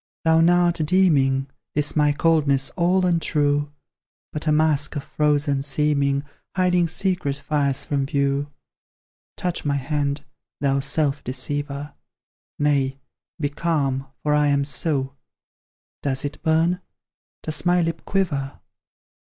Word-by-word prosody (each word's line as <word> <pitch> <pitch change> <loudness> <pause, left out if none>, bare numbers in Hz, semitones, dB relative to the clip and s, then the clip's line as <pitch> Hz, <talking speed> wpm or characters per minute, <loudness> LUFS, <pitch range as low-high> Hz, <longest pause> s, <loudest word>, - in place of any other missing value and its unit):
Thou 160 0 +5
now 175 +1 +4
art 175 -1 +1
deeming 145 -6 +3 0.3
This 150 0 +2
my 150 -1 +4
coldness 145 -3 +2
all 185 +1 +2
untrue, 145 -4 +1 0.6
But 150 +1 -4
a - - +4
mask 150 -1 +2
of 145 - -3
frozen 145 -2 +1
seeming, 140 -1 +1 0.3
Hiding 180 -2 +2
secret 175 -4 -1
fires 140 -1 -1
from 140 -2 -1
view. 140 -1 0 0.9
Touch 180 -1 -1
my 145 -1 0
hand, 140 +1 -2 0.3
thou 140 -1 +1
self 140 +1 +1
deceiver; 140 +3 -3 0.6
Nay 140 -2 +1 0.4
be 145 -2 0
calm, 140 -4 -1 0.2
for 150 - +1
I 150 0 +3
am 140 -1 +2
so: 140 -1 -1 0.9
Does 135 -1 0
it 145 - -6
burn? 165 +3 +2 0.6
Does 155 - -1
my 175 0 +3
lip 165 0 -3
quiver? 150 -9 -2
145 Hz, 125 wpm, -23 LUFS, 140-165 Hz, 0.9 s, Thou